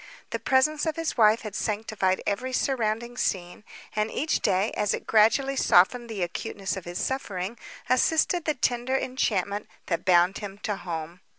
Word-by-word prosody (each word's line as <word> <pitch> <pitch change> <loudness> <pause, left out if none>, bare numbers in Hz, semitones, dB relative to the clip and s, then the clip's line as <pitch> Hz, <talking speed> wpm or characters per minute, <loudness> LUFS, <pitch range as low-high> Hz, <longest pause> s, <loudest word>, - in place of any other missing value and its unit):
The - - -2
presence 300 +4 +2
of 315 - 0
his 330 -1 -2
wife 220 -1 +5
had 215 -3 -7
sanctified 210 -3 -1
every 255 +6 -2
surrounding 235 -2 -1
scene, 180 -2 -2 0.3
and, 215 +1 0
each 310 +7 0
day, 190 +4 +1
as 210 0 0
it - - -9
gradually 230 +6 +3
softened 235 +2 +4
the 205 -5 -2
acuteness 190 +3 -4
of 190 - -7
his 175 0 -5
suffering, 205 -6 -3 0.3
assisted 320 +6 +2
the 305 - +1
tender 245 +1 0
enchantment 210 -6 -1 0.2
that 170 -2 -2
bound 180 0 +4
him 200 -2 -7
to 210 - -1
home. 170 -1 -6
215 Hz, 165 wpm, -26 LUFS, 190-255 Hz, 0.3 s, wife